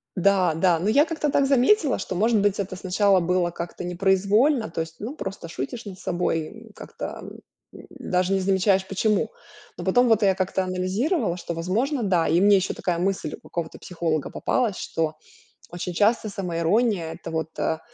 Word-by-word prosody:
Да 185 -2 +3
да, 170 0 +3
но 190 +5 0
я 285 +7 +5
как-то 315 -2 -2
так 280 - +3
заметила, 275 - +3
что, 190 - -5
может 220 +4 +3
быть, 205 0 +1
это 190 -1 -3
сначала 190 +1 +2
было 175 0 +1
как-то 170 +1 -6
непроизвольно, 200 - +2
то 165 - -3
есть, 160 0 -7
ну, 240 +8 -5
просто 190 - -6
шутишь 165 - -6
над 190 -2 -9
собой, 165 -3 -1
м, 225 +4 -13
как-то, - - -7
м, - - -10 0.5
даже 185 +1 -1
не 195 - +1
замечаешь, 190 0 +2
почему. 210 - 0 0.5
Но - - -6
потом 245 0 +4
вот 225 -1 +4
я 195 -1 +4
как-то 190 0 -1
анализировала, 185 - -1
что, 175 - -5
возможно, 225 - -1
да. 180 -5 +2
И 165 +3 +3
мне 200 0 +6
ещё 190 - -1
такая 175 -2 -2
мысль 185 -4 -1
у - - -16
какого-то 170 -2 -5
психолога 165 -4 -2
попалась, 230 -6 0
что 160 -3 -2 0.5
очень 175 +1 -5
часто 215 +4 +2
самоирония- 180 0 0
это 170 - -9
вот, 160 -1 -2
а, 160 - 0
190 Hz, 180 wpm, -24 LUFS, 175-215 Hz, 0.5 s, мне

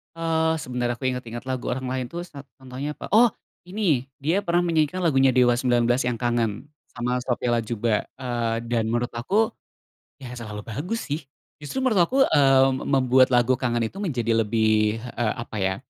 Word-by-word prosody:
Eee, 160 -1 0
sebentar 125 -3 -2
aku 125 +2 -3
inget-inget 125 0 -5
lagu 130 -1 -2
orang 130 0 -3
lain 130 0 -2
tuh 170 - -5
sat 140 -4 -11 0.2
contohnya 130 +3 -5
apa, - - -8
oh 235 0 +6 0.3
ini, 180 - 0 0.2
dia 165 +8 0
pernah 170 0 +2
menyanyikan 165 -1 +1
lagunya 135 -7 +3
Dewa 125 -1 +4
19 120 -1 +1 0.2
yang 120 -2 -2
"Kangen" 120 0 -1 0.2
sama 125 0 -2
Sophia 120 -1 0
Latjuba, 115 -1 -1 0.2
eee, 120 -3 -1
dan 115 -2 0
menurut 120 +1 0
aku, 200 - +1 0.7
ya 130 -3 -9
selalu 105 -4 -7
bagus 155 - -4
sih. 150 +1 -3 0.4
Justru 260 - -4
menurut 220 -8 +3
aku, 260 - -2
eee, 135 - +5
me 130 - -4
membuat 130 -1 +4
lagu 125 0 +3
"Kangen" 120 -2 0
itu 185 - -6
menjadi 125 - -1
lebih, 110 0 +2
eee, 120 -2 -2
apa 110 - -9
ya. 95 0 +1
125 Hz, 175 wpm, -24 LUFS, 120-150 Hz, 0.7 s, oh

